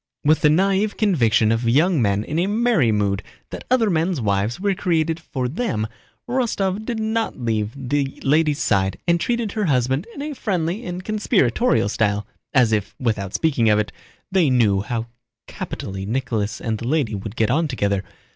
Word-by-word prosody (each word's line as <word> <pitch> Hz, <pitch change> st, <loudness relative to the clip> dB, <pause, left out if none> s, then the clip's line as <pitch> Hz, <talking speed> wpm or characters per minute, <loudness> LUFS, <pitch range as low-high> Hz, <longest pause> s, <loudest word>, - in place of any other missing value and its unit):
With 155 Hz, +1 st, +3 dB
the 150 Hz, -, +5 dB
naïve 195 Hz, +5 st, +2 dB
conviction 120 Hz, -, +3 dB
of 115 Hz, +1 st, +1 dB
young 155 Hz, +4 st, +3 dB
men 100 Hz, -1 st, +1 dB
in 155 Hz, +8 st, -2 dB
a 180 Hz, -, +1 dB
merry 215 Hz, -, +2 dB
mood 100 Hz, -1 st, 0 dB, 0.3 s
that -, -, -7 dB
other 245 Hz, -3 st, +3 dB
men's 170 Hz, -2 st, +1 dB
wives 105 Hz, -, 0 dB
were 200 Hz, +1 st, +1 dB
created 165 Hz, -3 st, 0 dB
for 130 Hz, -5 st, -3 dB
them, 145 Hz, -, -2 dB, 0.4 s
Rostóv 215 Hz, -5 st, -1 dB
did 235 Hz, -2 st, -3 dB
not 220 Hz, +1 st, -1 dB
leave 110 Hz, -3 st, -1 dB
the 140 Hz, +1 st, -2 dB
lady's 150 Hz, +1 st, +3 dB
side 95 Hz, -6 st, +1 dB
and 170 Hz, 0 st, +3 dB
treated 235 Hz, +1 st, -1 dB
her 215 Hz, -1 st, -1 dB
husband 130 Hz, -, +1 dB
in 280 Hz, -, -5 dB
a 300 Hz, 0 st, -4 dB
friendly 190 Hz, -, -2 dB
and 180 Hz, +1 st, -5 dB
conspiratorial 210 Hz, -, +2 dB
style, 105 Hz, -1 st, 0 dB, 0.3 s
as 125 Hz, -5 st, +4 dB
if, 105 Hz, -1 st, -1 dB
without 105 Hz, -6 st, -2 dB
speaking 135 Hz, -9 st, +2 dB
of 105 Hz, -, +4 dB
it, 105 Hz, -1 st, -1 dB, 0.4 s
they 185 Hz, -6 st, +3 dB
knew 110 Hz, -6 st, +3 dB
how 115 Hz, +2 st, -3 dB, 0.4 s
capitally 95 Hz, 0 st, -6 dB
Nicholas 115 Hz, -3 st, -2 dB
and 110 Hz, -2 st, -2 dB
the 115 Hz, -, -5 dB
lady 140 Hz, -5 st, +1 dB
would 100 Hz, +2 st, -5 dB
get 110 Hz, 0 st, +1 dB
on 160 Hz, +4 st, +2 dB
together. 100 Hz, -7 st, -1 dB
140 Hz, 175 wpm, -22 LUFS, -, 0.4 s, the